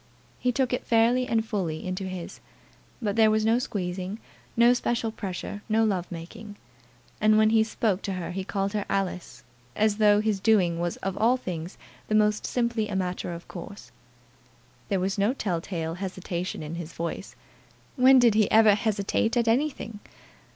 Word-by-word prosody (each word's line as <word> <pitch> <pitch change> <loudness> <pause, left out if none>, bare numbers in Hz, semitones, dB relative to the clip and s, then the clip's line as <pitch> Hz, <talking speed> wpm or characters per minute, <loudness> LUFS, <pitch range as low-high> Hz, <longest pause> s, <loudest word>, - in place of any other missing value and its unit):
He 250 - +1
took 255 0 0
it 250 - -1
fairly 240 +2 +3
and 225 -1 +1
fully 175 -8 -3
into 185 +1 -3
his; 185 -2 -7 0.6
but 205 -2 0
there 220 -1 +5
was 215 0 +2
no 225 +2 +3
squeezing, 185 -4 -4 0.4
no 235 +1 +6
special 240 -2 -1
pressure, 205 -1 -6
no 220 +1 +3
love 190 -4 -1
making. 175 +5 -9 0.7
And 215 0 +5
when 215 0 +4
he 220 -1 +5
spoke 215 -3 -1
to 195 - -3
her 180 -2 -4
he 190 +1 -3
called 195 +1 -2
her 210 -1 -1
Alice, 190 -3 -3 0.3
as 215 -1 +2
though 210 -1 +5
his 215 -2 0
doing 190 -5 +3
so - - -3
was 175 0 -2
of 195 -1 -1
all 235 +4 +4
things 175 -6 -6 0.3
the 215 - 0
most 210 0 +2
simply 235 -3 0
a 200 - -3
matter 180 -1 -2
of 170 0 -8
course. 195 +3 -10 1.0
There 195 - +1
was 190 +2 -1
no 205 +5 +2
tell 180 -9 -2
tale 165 -3 -4
hesitation 180 -2 -4
in 150 +2 -6
his 165 0 -9
voice. 170 0 -5 0.6
When 260 0 +6
did 240 -3 +5
he 215 -1 +3
ever 220 -1 +6
hesitate 215 +2 0
at 235 -1 +2
anything? 235 -3 0
205 Hz, 180 wpm, -26 LUFS, 185-225 Hz, 1.0 s, no